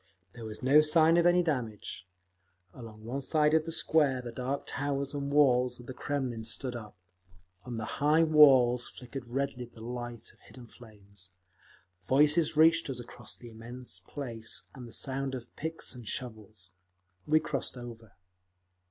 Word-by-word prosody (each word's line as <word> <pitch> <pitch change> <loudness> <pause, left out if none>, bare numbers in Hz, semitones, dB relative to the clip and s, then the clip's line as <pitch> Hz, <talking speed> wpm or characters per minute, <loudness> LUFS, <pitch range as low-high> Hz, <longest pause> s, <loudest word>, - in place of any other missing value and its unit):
There 115 -2 -9
was 110 +2 -8
no 140 +4 +7
sign 160 +2 +4
of 170 0 +5
any 175 0 +4
damage…. 115 - -4 0.7
Along 110 -3 -11
one 130 +4 -3
side 150 +2 +2
of 160 -1 +3
the 165 - -4
square 155 -4 +2
the 120 -1 -6
dark 130 +4 -3
towers 140 0 -2
and 140 -1 -3
walls 125 -4 +3
of 120 - -11
the 130 - -7
Kremlin 130 -5 -3
stood 120 +3 -2
up. 105 -4 -9 0.7
On 120 -2 -5
the 110 - -3
high 150 +6 +2
walls 135 -6 +6
flickered 125 0 -9
redly 130 0 -2
the 120 -1 -17
light 120 0 -7
of - - -29
hidden 125 -2 -14
flames; 100 -6 -14 0.7
voices 150 +3 +3
reached 165 0 +5
us 130 -2 -4
across 120 - -7
the 120 - -11
immense 115 -2 -7
place, 115 +2 -6
and 125 -3 -9
the 115 - -13
sound 135 0 -2
of 125 -1 -10
picks 160 +1 -3
and 120 -4 -11
shovels. 110 -6 -7 0.6
We 155 +1 +5
crossed 140 -4 -4
over. 115 -3 -10
125 Hz, 160 wpm, -30 LUFS, 115-145 Hz, 0.7 s, no